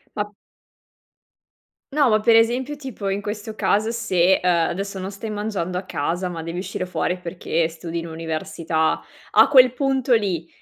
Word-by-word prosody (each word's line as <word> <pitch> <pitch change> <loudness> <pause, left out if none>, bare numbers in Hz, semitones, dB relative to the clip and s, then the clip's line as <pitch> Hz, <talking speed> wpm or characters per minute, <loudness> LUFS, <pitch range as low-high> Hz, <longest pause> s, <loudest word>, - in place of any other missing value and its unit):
Ma... 205 0 -3 1.6
No, 290 -2 +4
ma, 215 -2 +4
per 230 +1 +4
esempio, 245 +5 +3
tipo 260 -8 -6
in 195 +1 -1
questo 210 +1 -5
caso, 215 +2 +1
se, 190 -5 +2
uhm, 180 - +3
adesso 185 +3 0
non 190 +2 -5
stai 215 +3 -6
mangiando 205 -4 -2
a - - -4
casa 175 +2 -2
ma 165 -2 -5
devi 165 +2 -5
uscire 185 0 -4
fuori 180 +1 -1
perché 170 -2 -1
studi 165 +1 -6
in 165 - -7
università. 160 0 -1 0.3
A - - +7
quel 255 -3 +7
punto 265 -1 0
lì, 180 -7 0
195 Hz, 165 wpm, -22 LUFS, 170-225 Hz, 1.6 s, A